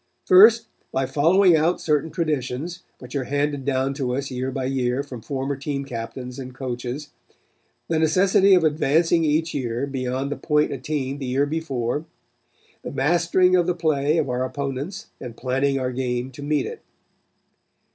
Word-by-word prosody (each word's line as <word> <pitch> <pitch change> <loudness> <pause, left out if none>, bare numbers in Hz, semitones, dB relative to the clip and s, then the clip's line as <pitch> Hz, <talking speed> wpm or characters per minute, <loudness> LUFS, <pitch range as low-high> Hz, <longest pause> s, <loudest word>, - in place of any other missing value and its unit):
First, 220 +5 +7 0.3
by 135 0 0
following 165 +7 +4
out 160 +3 +2
certain 150 0 0
traditions, 155 0 -3 0.2
which 125 +1 -11
are 135 -2 -1
handed 145 0 -1
down 135 0 0
to 130 -3 -2
us 135 0 -3
year 130 +1 -2
by 130 0 -3
year 130 0 0
from 130 -5 -9
former 135 +3 -3
team 140 0 -4
captains 125 +1 -6
and 130 -1 -8
coaches; 125 +3 -5 0.8
the 160 -1 0
necessity 190 +5 +4
of 180 - +3
advancing 160 +2 +2
each 160 +2 +1
year 125 -2 -2
beyond 135 0 -3
the - - -3
point 150 -1 +1
attained 135 0 -3
the 135 - -4
year 135 +3 +1
before; 145 -3 -2 0.8
the - - -6
mastering 175 +5 +3
of 175 -1 +2
the 180 - +1
play 155 -2 +1
of - - +1
our 125 0 -1
opponents 140 +7 -4
and 120 -3 -8
planning 135 +2 0
our 130 -1 -2
game 125 0 -2
to 130 - -11
meet 145 -1 0
it. - - -7
140 Hz, 165 wpm, -23 LUFS, 130-160 Hz, 0.8 s, First